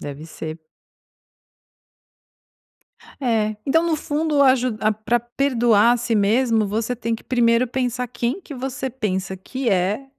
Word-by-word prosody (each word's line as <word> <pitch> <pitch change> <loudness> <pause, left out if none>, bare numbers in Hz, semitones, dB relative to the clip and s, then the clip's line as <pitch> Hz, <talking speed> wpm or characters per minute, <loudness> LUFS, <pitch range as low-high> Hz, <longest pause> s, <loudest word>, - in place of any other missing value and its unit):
Deve 145 +2 -7
ser. 160 0 -7 2.6
É, 220 -4 0
então 325 +4 +2
no 325 - +1
fundo 300 -1 0
a 260 -1 +6
ju 250 -3 -2
ah, 215 0 +2
pra 215 +3 0
perdoar 240 -3 +3
a - - +2
si 235 -1 -1
mesmo, 220 +1 +2
você 225 +4 -2
tem 230 0 -2
que 225 - -8
primeiro 240 0 +2
pensar 250 0 -2
quem 240 +7 -2
que 305 -6 -10
você 260 +1 -4
pensa 190 -6 -3
que 255 +6 -4
é 195 +7 0
240 Hz, 145 wpm, -22 LUFS, 215-260 Hz, 2.6 s, a